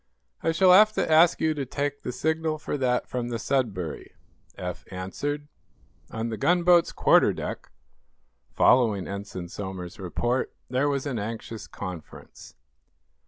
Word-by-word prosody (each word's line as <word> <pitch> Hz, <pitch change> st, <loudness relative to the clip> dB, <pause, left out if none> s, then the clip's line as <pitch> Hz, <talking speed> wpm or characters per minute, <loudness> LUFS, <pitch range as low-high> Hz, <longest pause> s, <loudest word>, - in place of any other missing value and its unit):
"I 165 Hz, -, +1 dB
shall 180 Hz, +3 st, +5 dB
have 215 Hz, +3 st, +7 dB
to 165 Hz, -, -1 dB
ask 165 Hz, +2 st, +6 dB
you 160 Hz, -1 st, +2 dB
to 145 Hz, -2 st, -3 dB
take 145 Hz, +2 st, -3 dB
the -, -, -4 dB
signal 160 Hz, +4 st, -1 dB
for 150 Hz, -, -4 dB
that 125 Hz, -3 st, 0 dB
from 125 Hz, -1 st, -3 dB
the 120 Hz, -, -2 dB
'Sudbury,'" 110 Hz, -, -2 dB, 0.4 s
Eph 90 Hz, -1 st, -5 dB
answered. 145 Hz, +11 st, -4 dB, 0.6 s
On 115 Hz, +1 st, -3 dB
the 110 Hz, -, -4 dB
gunboat's 175 Hz, -, +4 dB
quarter -, -, +4 dB
deck, -, -, -6 dB, 0.8 s
following 110 Hz, -7 st, +3 dB
Ensign 100 Hz, -3 st, -6 dB
Somers's 95 Hz, -2 st, -7 dB
report, 120 Hz, +8 st, -2 dB, 0.2 s
there 135 Hz, +3 st, +2 dB
was 140 Hz, -1 st, -1 dB
an 130 Hz, -6 st, -2 dB
anxious 110 Hz, 0 st, -6 dB
conference. 90 Hz, -5 st, -9 dB
125 Hz, 140 wpm, -26 LUFS, 100-150 Hz, 0.8 s, have